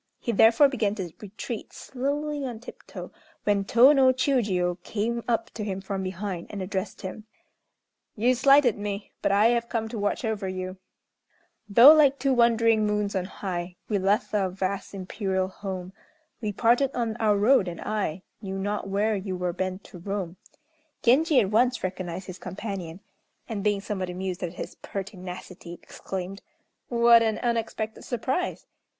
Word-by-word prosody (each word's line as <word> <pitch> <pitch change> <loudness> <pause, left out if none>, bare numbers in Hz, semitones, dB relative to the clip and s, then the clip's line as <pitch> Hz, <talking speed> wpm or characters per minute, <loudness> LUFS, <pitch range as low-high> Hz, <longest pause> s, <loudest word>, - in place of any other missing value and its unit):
He 235 - -2
therefore 230 +6 +6
began 220 -7 -1
to 185 -5 -5
retreat 215 +2 -7
slowly 285 +3 -3
on 245 -4 -5
tip 240 - -11
toe, - - -8 0.3
when 205 -1 +2
Tô 245 +8 +6
no 260 -1 +6
Chiûjiô 205 -10 0
came 230 +5 -2
up 230 -1 0
to 215 - -5
him 195 -2 -3
from 195 0 -4
behind, 185 -1 -4
and 205 - -6
addressed 190 +1 -4
him: 200 +3 -6 0.9
"You 240 +4 +3
slighted 265 -3 +5
me, 205 0 -4
but - - +1
I 205 +3 +5
have 235 -1 0
come 225 -2 -1
to 225 -1 -5
watch 205 +4 -1
over 215 -3 -2
you: 185 0 -5 0.9
Though 240 +9 +10
like 285 -3 +5
two 275 -1 +1
wandering 230 -2 +4
moons 210 -1 -1
on 185 -1 0
high 180 -2 -5
We 205 -2 +1
left 200 +5 +1
our 195 -3 +1
vast 190 +2 -3
imperial 190 0 -2
home, 190 -1 -6 0.5
We 215 -2 -1
parted 240 +6 +3
on 230 -3 -1
our 215 -3 +2
road, 210 -1 +4
and 170 -1 -5
I 195 -5 -2 0.2
Knew 195 -2 -5
not 200 0 -2
where 210 +2 +1
you 190 -1 -4
were 180 -1 -2
bent 185 +2 -3
to 180 - -12
roam." 190 -1 -4 0.7
Genji 280 +4 +5
at 195 -2 -1
once 245 +3 +2
recognized 185 -1 -4
his 185 -1 -8
companion; 190 -4 -6 0.5
and, 210 -3 -4
being 205 -2 +1
somewhat 190 -3 -3
amused 185 0 -4
at 175 -2 -3
his - - -7
pertinacity, 185 -3 -7
exclaimed: 190 +1 -6 0.5
"What 235 -1 +6
an 220 -1 +1
unexpected 225 -2 -2
surprise! 260 +8 -2
205 Hz, 165 wpm, -26 LUFS, 190-235 Hz, 0.9 s, Though